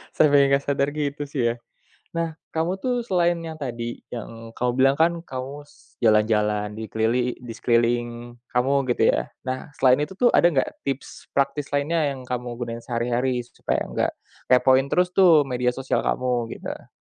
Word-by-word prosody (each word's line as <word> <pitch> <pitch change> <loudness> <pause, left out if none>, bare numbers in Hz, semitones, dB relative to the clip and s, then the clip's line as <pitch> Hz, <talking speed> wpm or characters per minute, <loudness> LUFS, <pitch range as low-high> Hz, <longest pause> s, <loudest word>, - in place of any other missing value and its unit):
Sampe 150 -2 +5 0.2
gak 140 0 +3
sadar 140 0 +1
gitu 145 -1 -3
sih, 140 -2 -3
ya. 115 - +1 0.6
Nah, 165 -1 -2 0.2
kamu 160 +2 0
tuh 250 +4 -1
selain 175 -5 +1
yang 160 -1 -6
tadi, 120 -4 -5
yang 115 -1 -8
kamu 125 0 0
bilang 135 +1 +4
kan, 170 +1 +5
kamu 135 +2 -6
s - - -24
jalan-jalan 105 -1 +2
di 110 - -5
kelili 115 +4 0
di 120 -2 -8
sekeliling 120 0 0 0.2
kamu, 135 +2 +2
gitu - - +3
ya? - - -2 0.2
Nah, 130 +3 -4
selain 130 0 +5
itu 170 - -11
tuh, 240 +5 +4
ada - - +5
nggak 135 -3 -2
tips 135 0 -5
praktis 140 +1 -1
lainnya, 150 +3 +1
yang 130 - -9
kamu 125 -1 -3
gunain 115 -1 -5
sehari-hari? 125 +1 0
Supaya - - -2
nggak - - 0 0.4
kepoin 130 +1 +5
terus 180 0 +3
tuh 170 -6 +7
media 125 0 0
sosial 135 +1 -1
kamu, 125 -2 -1
gitu. - - -8
130 Hz, 170 wpm, -24 LUFS, 120-145 Hz, 0.6 s, tuh